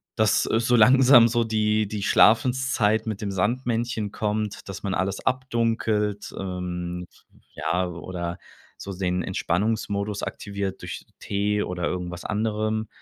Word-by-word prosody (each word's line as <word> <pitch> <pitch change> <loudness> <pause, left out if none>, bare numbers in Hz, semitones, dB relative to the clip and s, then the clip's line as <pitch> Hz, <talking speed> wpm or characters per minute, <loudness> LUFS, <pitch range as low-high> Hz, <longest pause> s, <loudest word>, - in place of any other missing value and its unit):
dass 110 -2 +3
so 115 +2 +2
langsam 125 +1 +7
so 120 0 +1
die 110 -1 +1
die 105 0 -4
Schlafenszeit 115 -2 +3
mit 110 -3 -3
dem 100 -2 -2
Sandmännchen 115 +1 -1
kommt, 105 -1 -3
dass 95 -1 -7
man 100 - -1
alles 95 +1 -2
abdunkelt, 115 -5 0
ähm, 90 -1 -4 0.5
ja 90 +3 -1
oder 85 0 -5 0.4
so 100 - -6
den 90 -1 0
Entspannungsmodus 100 +2 -1
aktiviert 100 -1 -4
durch - - -7
Tee 105 +1 0
oder 90 -1 -4
irgendwas 90 0 -4
anderem. 110 +1 -1
105 Hz, 125 wpm, -25 LUFS, 95-115 Hz, 0.5 s, langsam